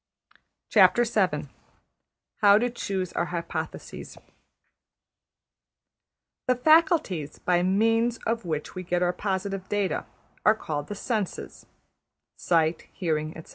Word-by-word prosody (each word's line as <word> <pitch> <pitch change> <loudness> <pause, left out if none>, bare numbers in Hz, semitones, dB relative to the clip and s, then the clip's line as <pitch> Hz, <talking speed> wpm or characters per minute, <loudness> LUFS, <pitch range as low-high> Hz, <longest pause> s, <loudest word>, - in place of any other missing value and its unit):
\chapter{How 200 - +1
to 245 +2 0
Choose 190 -6 -3
Our 175 - 0
Hypotheses} 170 -1 -6 2.3
The 255 - +3
faculties 310 - +3
by 175 -1 +1
means 225 +5 +2
of 230 0 -1
which 155 -3 -4
we 185 - -5
get 180 0 0
our 180 0 +1
positive 195 -1 -3
data 205 -2 -1 0.4
are 215 - +5
called 150 -8 -4
the 205 - -5
senses 210 -2 -4 0.7
(sight, 165 -1 +1
hearing, 155 -4 -2
etc.). 160 - -11
190 Hz, 100 wpm, -26 LUFS, 175-225 Hz, 2.3 s, are